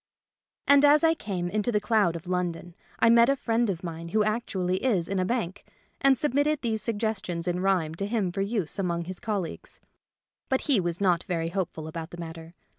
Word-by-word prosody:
And 285 0 +6
as 290 +1 +6
I 325 0 +5
came 190 - -4
into 215 +5 0
the 210 - +2
cloud 210 -5 +2
of 165 - -7
London 175 -1 -3 0.2
I 230 - +5
met 235 +1 +6
a 275 - +4
friend 235 -3 0
of 185 -2 -3
mine 165 -1 -6
who 215 +4 +2
actually 190 -4 -1
is 200 -10 +1
in 195 0 -1
a 185 - +1
bank, 210 -4 -2 0.4
and 275 -1 +5
submitted 290 +2 +1
these 220 -2 -1
suggestions 205 -5 -2
in 175 0 0
rhyme 180 -5 +1
to 195 +5 -3
him 205 -5 0
for 195 - -3
use 200 -4 -2
among 170 -3 -1
his 185 +1 -6
colleagues. 200 -6 -4 0.7
But 265 - +1
he 270 -8 +2
was 175 0 -2
not 180 -3 +3
very 165 -2 -1
hopeful 170 -4 -3
about 160 +1 -6
the 175 - -10
mat 165 -1 -6
ter. 165 +1 -12
195 Hz, 205 wpm, -27 LUFS, 175-230 Hz, 0.7 s, And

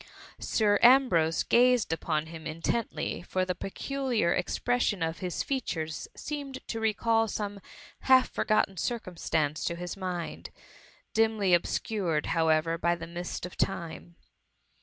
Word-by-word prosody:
Sir 205 -2 +2
Ambrose 235 -11 +5
gazed 245 -7 +4
upon 155 -1 -1
him 160 0 -8
intently, 165 +6 -2
for 185 +1 -1
the 185 - -1
peculiar 235 0 -1
expression 245 -7 0
of 160 0 -2
his 180 -2 -2
features 165 - -3
seeniF 285 -2 -5
ed - - -18
to 225 - -2
recall 225 +1 +2
some 205 -1 -4 0.4
half 260 -1 +5
forgotten 215 -3 +1
circumstance 165 -8 -1
to 170 - -1
his 175 0 -5
mind, 180 -3 -5 0.6
dimly 220 -4 +2
obscured, 175 -2 0
however, 165 0 +2
by 170 0 +2
the 165 -1 -7
mist 175 +1 -5
of 180 - -9
time. 170 -2 -3
185 Hz, 130 wpm, -29 LUFS, 165-225 Hz, 0.6 s, Ambrose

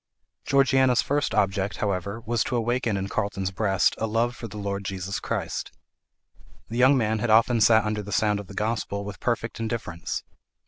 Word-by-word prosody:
Georgiana's 135 -2 +4
first 145 0 0
object, 100 0 0
however, 100 +2 -2
was 115 +1 0
to 125 - -2
awaken 120 -2 0
in 95 0 -2
Carlton's 100 -2 -2
breast 95 -2 +2
a 110 - 0
love 115 +2 0
for 115 - -7
the 105 - -9
Lord 100 -1 -3
Jesus 95 0 -4
Christ. - - -3 1.0
The 115 - -4
young 130 +2 +6
man 110 -2 +1
had 115 - -1
often 115 +1 +4
sat 110 0 +5
under 105 0 -1
the 105 0 -8
sound 105 0 +2
of 100 - -8
the 100 - -11
gospel 105 -2 -2
with 105 -1 -7
perfect 115 -2 -2
indifference. 110 -7 -4
110 Hz, 180 wpm, -25 LUFS, 100-120 Hz, 1.0 s, young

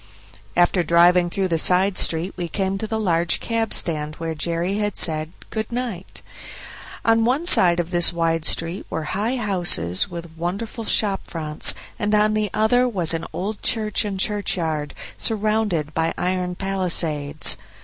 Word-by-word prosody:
After 175 +1 +3
driving 175 +1 +4
through 190 +1 -1
the 165 -1 +1
side 185 +3 +4
street 170 +3 -1
we 175 -2 -4
came 195 +2 -2
to 220 - -3
the 220 0 -2
large 170 -4 +1
cab 225 -1 -2
stand 155 -2 -1
where 165 -1 -4
Jerry 170 +5 -2
had 210 -1 -2
said 155 -1 +1 0.2
"Good 220 0 -4
night". 235 -7 -6 0.8
On 225 0 +3
one 260 +8 0
side 175 - +5
of 175 0 -3
this 175 -1 +3
wide 165 -1 -1
street 165 +4 0
were 160 - -3
high 220 +6 -1
houses 175 - +1
with 170 -2 -9
wonderful 200 +7 -4
shop 200 -3 +1
fronts, 155 -2 -1 0.2
and 210 +1 +1
on 210 0 +3
the 215 -1 0
other 245 +3 +2
was 175 -7 +2
an 165 0 -3
old 205 +3 -5
church 220 -3 +1
and 200 -2 -4
churchyard, 165 -7 -1 0.2
surrounded 210 -8 -1
by 165 0 -1
iron 180 0 -2
palisades. 165 -6 +1
180 Hz, 160 wpm, -22 LUFS, 165-210 Hz, 0.8 s, side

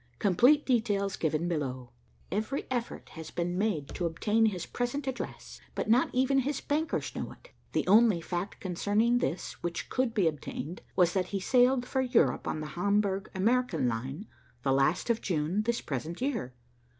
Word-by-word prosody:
Complete 245 - +4
details 205 -6 +1
given 160 +1 0
below. 130 -7 -3 0.4
Every 215 +8 -2
effort 240 -2 -3
has 160 -1 -8
been 175 0 -2
made 185 -8 0
to 175 - -2
obtain 215 +7 +2
his 185 -5 -2
present 245 +4 -3
address, 265 -1 -6
but - - 0
not 245 +3 +4
even 265 +2 +3
his 275 +2 -1
bankers 310 +3 -1
know - - -4
it. - - -20 0.2
The - - +1
only 210 -1 +5
fact 175 +3 -4
concerning 205 +6 +1
this 180 - -3
which 175 -1 -4
could 255 -2 0
be 195 -6 +3
obtained 155 +2 -4
was 175 -2 +4
that 185 -2 0
he 200 - -2
sailed 250 +4 +3
for 265 +1 0
Europe 250 -2 +2
on 155 - -2
the 155 - -4
Hamburg 200 +2 +1
American 210 - +2
line, 130 - -3 0.4
the 135 - +2
last 150 - +2
of 230 - -1
June, 170 +3 0
this 235 +2 -1
present 155 +5 -4
year. 230 - -2
200 Hz, 170 wpm, -30 LUFS, 170-245 Hz, 0.4 s, only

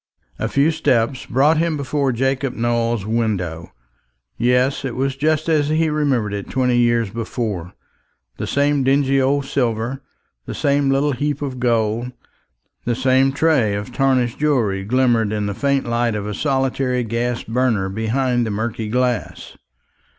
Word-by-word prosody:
A - - -1
few 140 +3 +2
steps 130 -5 0
brought 145 +5 +3
him 165 -2 0
before 140 -1 0
Jacob 135 +1 -1
Nowell's 115 -2 0
window. 100 -7 -2 0.6
Yes, 125 +3 +1
it 130 -3 -4
was 135 +1 -1
just 155 +3 0
as 150 -3 +2
he 160 0 +1
remembered 135 -9 0
it 100 -1 -5
twenty 125 -2 +1
years 120 -3 +2
before 110 -6 -4 0.6
the - - -4
same 145 0 +1
dingy 135 0 +2
old 140 +1 +1
silver, 125 0 -1 0.5
the - - -5
same 140 -1 +1
little 140 +2 +2
heap 145 +2 -2
of 130 -3 -4
gold, 120 0 0 0.7
the 120 0 -1
same 130 +1 +3
tray 135 -8 +2
of 105 +5 -5
tarnished 130 -3 +1
jewelry 120 -10 +1
glimmered 120 -1 +2
in 105 -1 -1
the 100 - -2
faint 140 +5 0
light 120 -1 0
of 105 -1 -3
a 105 - -4
solitary 135 -2 0
gas 120 +2 -2
burner 115 -5 0
behind 120 +4 0
the - - -2
murky 110 +1 -3
glass. 125 -1 -2
125 Hz, 150 wpm, -20 LUFS, 115-135 Hz, 0.7 s, brought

